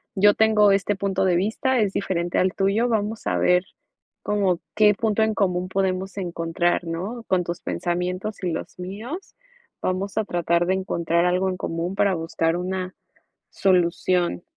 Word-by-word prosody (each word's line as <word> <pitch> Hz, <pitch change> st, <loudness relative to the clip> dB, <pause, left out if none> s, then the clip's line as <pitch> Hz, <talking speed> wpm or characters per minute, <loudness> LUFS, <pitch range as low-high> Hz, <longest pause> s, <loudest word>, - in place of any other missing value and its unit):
yo 205 Hz, +1 st, +5 dB
tengo 215 Hz, -2 st, +5 dB
este 200 Hz, +1 st, +1 dB
punto 195 Hz, -1 st, 0 dB
de 180 Hz, -2 st, +3 dB
vista. 225 Hz, +8 st, +1 dB
Es 205 Hz, -3 st, +1 dB
diferente 175 Hz, -3 st, -1 dB
al 185 Hz, +1 st, +2 dB
tuyo. 200 Hz, +5 st, +1 dB
Vamos 220 Hz, 0 st, -1 dB
a -, -, +1 dB
ver, 180 Hz, +1 st, +3 dB, 0.6 s
como 195 Hz, -4 st, +1 dB
qué 210 Hz, -1 st, +5 dB
punto 220 Hz, 0 st, 0 dB
en 220 Hz, 0 st, +1 dB
común, 180 Hz, -2 st, 0 dB
podemos 190 Hz, 0 st, -1 dB
encontrar, 175 Hz, -1 st, -1 dB
¿no?, 190 Hz, +9 st, -4 dB
con 185 Hz, -1 st, +2 dB
tus 175 Hz, 0 st, -4 dB
pensamientos 180 Hz, +4 st, -3 dB
y 180 Hz, -, 0 dB
los 165 Hz, -, -6 dB
míos, 220 Hz, -, -7 dB, 0.5 s
vamos 190 Hz, +3 st, -2 dB
a 220 Hz, -, +3 dB
tratar, 175 Hz, -1 st, +1 dB
de 190 Hz, -, +2 dB
encontrar 170 Hz, -2 st, 0 dB
algo 180 Hz, +1 st, +1 dB
en 185 Hz, -, -3 dB
común, 170 Hz, +2 st, -3 dB
para 200 Hz, -1 st, +2 dB
buscar 165 Hz, 0 st, -1 dB
una 185 Hz, +1 st, -3 dB, 0.6 s
solución. 180 Hz, -1 st, +1 dB
185 Hz, 160 wpm, -23 LUFS, 175-205 Hz, 0.6 s, yo